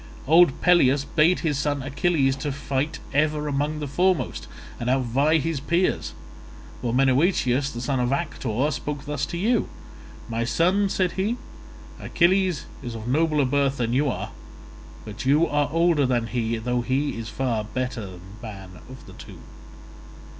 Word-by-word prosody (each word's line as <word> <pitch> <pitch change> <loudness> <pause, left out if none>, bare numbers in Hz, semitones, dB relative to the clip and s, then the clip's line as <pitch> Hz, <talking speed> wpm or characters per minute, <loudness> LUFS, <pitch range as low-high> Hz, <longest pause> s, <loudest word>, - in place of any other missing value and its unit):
Old 160 0 +5
Peleus 145 -6 +4
bade 165 +4 +2
his 150 -5 0
son 145 -2 -1
Achilles 145 -1 +1
fight 140 +1 -2 0.2
ever 150 +1 +1
among 145 +2 -1
the 150 -1 -4
foremost 180 +5 0 0.3
and 120 - -2
outvie 135 +5 +2
his 160 0 -2
peers, 170 +6 0 0.7
while 120 -1 -1
Menoetius 135 +1 +2
the 120 - -6
son 135 +1 -1
of 125 0 0
Actor 140 -3 -1
spoke 145 +1 -5
thus 145 -1 -2
to 175 - -5
you: 225 +6 +1 0.6
'My 115 0 -2
son,' 180 - +2
said 185 -2 0
he, 210 +6 -1 0.6
'Achilles 180 -2 +1 0.2
is 120 -3 -6
of 110 0 -7
nobler 150 +1 +2
birth 140 +1 +1
than 120 -1 -1
you 140 +3 +2
are, - - -4 0.7
but 105 -1 -7
you 150 +5 +4
are 145 -1 0
older 165 -4 +3
than 120 -2 +1
he, 115 -1 -2
though 125 +2 -1
he 135 +4 -1
is 115 -1 -6
far 120 -5 -1
the 105 - -12
better 110 -6 -4 0.2
man 95 -5 -9
of 130 0 -12
the - - -13
two. - - -12
140 Hz, 155 wpm, -24 LUFS, 125-160 Hz, 0.7 s, Old